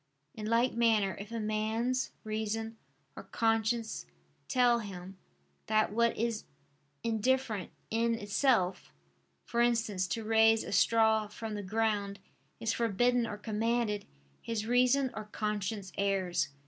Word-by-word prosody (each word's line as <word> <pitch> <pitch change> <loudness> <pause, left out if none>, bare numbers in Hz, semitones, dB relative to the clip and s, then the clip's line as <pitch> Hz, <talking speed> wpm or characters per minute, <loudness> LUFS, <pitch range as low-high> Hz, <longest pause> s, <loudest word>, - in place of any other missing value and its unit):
In 215 -1 -6
like 235 +3 +2
manner 220 -4 +2
if 205 +2 -8
a 230 - -3
man's 220 +4 -1
reason 220 +1 -3 0.4
or - - -7
conscience 225 - 0 0.4
tell 245 -2 +3
him, 190 -3 -8 0.5
that 215 -1 +2
what 235 +1 +2
is 230 -1 -1 0.6
indifferent 230 -3 0 0.2
in 230 +1 +2
itself, 205 - +1 0.5
for 235 - 0
instance 220 -6 +1
to 225 +4 -3
raise 225 0 +4
a - - -7
straw 220 +1 +3
from 215 +1 -6
the 205 - -3
ground, 205 -1 -1 0.4
is 225 0 0
forbidden 235 +2 +2
or 210 - -5
commanded, 220 0 -1 0.3
his 225 -2 -3
reason 250 +3 +3
or 215 - -6
conscience 210 -2 -3
errs. 185 -5 +1
220 Hz, 125 wpm, -31 LUFS, 210-230 Hz, 0.6 s, raise